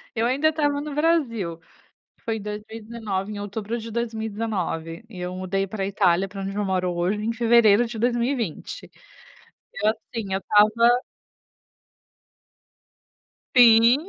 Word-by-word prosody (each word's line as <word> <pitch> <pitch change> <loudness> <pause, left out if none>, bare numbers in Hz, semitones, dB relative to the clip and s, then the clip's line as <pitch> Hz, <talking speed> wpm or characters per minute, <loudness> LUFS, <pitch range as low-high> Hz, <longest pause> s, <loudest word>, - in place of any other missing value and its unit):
Eu 225 +1 +1
ainda 285 +5 +2
estava 290 -2 0
no 300 -1 -6
Brasil. 235 - 0 0.7
Foi 225 -1 -2
2019, 210 -1 -5
em 205 - -6
outubro 210 +3 -4
de 225 0 -7
2019, 220 -6 -3
e 185 - -10
eu 180 0 -4
mudei 190 +1 -2
para 195 -1 -3
Itália, 195 -2 +2
para 200 0 -8
onde 195 +1 -4
eu 210 - 0
moro 185 -1 0
hoje, 185 +5 -1
em 230 +1 -1
fevereiro 230 -1 +5
de 230 -1 -7
2020. 240 - -2 0.8
Eu 210 +1 +2
assim, 220 -2 -6
eu 195 - -1
estava 230 +5 +4 2.5
Sim. 235 0 +7
220 Hz, 130 wpm, -24 LUFS, 195-235 Hz, 2.5 s, Sim